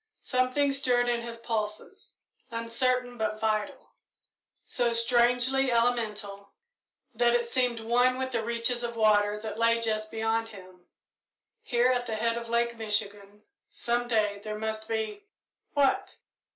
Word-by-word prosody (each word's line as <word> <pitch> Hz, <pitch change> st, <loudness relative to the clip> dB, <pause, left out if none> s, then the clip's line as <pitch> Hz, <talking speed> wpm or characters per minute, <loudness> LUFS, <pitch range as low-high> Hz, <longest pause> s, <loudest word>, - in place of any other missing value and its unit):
Something 255 Hz, +3 st, +1 dB
stirred 250 Hz, -3 st, +2 dB
in 240 Hz, -1 st, 0 dB
his 235 Hz, 0 st, -7 dB
pulses, 215 Hz, -2 st, -5 dB, 0.3 s
uncertain 245 Hz, +1 st, -1 dB
but 215 Hz, -1 st, -2 dB
vital; 215 Hz, -2 st, -2 dB, 0.7 s
so 240 Hz, -2 st, 0 dB
strangely 245 Hz, +3 st, +3 dB
elemental 215 Hz, -4 st, -1 dB, 0.6 s
that 240 Hz, 0 st, +3 dB
it 240 Hz, 0 st, +1 dB
seemed 245 Hz, -1 st, 0 dB
one 245 Hz, +3 st, +2 dB
with 260 Hz, 0 st, -3 dB
the 230 Hz, -2 st, -1 dB
reaches 235 Hz, +1 st, 0 dB
of 235 Hz, -1 st, -4 dB
water 210 Hz, -1 st, +3 dB
that 220 Hz, 0 st, -6 dB
lay 230 Hz, 0 st, +3 dB
just 215 Hz, -1 st, -1 dB
beyond 225 Hz, 0 st, -1 dB
him. 185 Hz, -3 st, -14 dB, 0.7 s
Here, 245 Hz, +1 st, +2 dB
at 245 Hz, -1 st, -1 dB
the 220 Hz, -, -2 dB
head 230 Hz, +1 st, 0 dB
of 235 Hz, 0 st, -6 dB
Lake 235 Hz, 0 st, +1 dB
Michigan, 205 Hz, -1 st, -3 dB, 0.3 s
some 240 Hz, 0 st, -2 dB
day 210 Hz, -3 st, +1 dB
there 215 Hz, 0 st, -5 dB
must 220 Hz, 0 st, -4 dB
be 220 Hz, -, -4 dB, 0.5 s
what? 280 Hz, -2 st, +1 dB
230 Hz, 140 wpm, -28 LUFS, 215-245 Hz, 0.7 s, strangely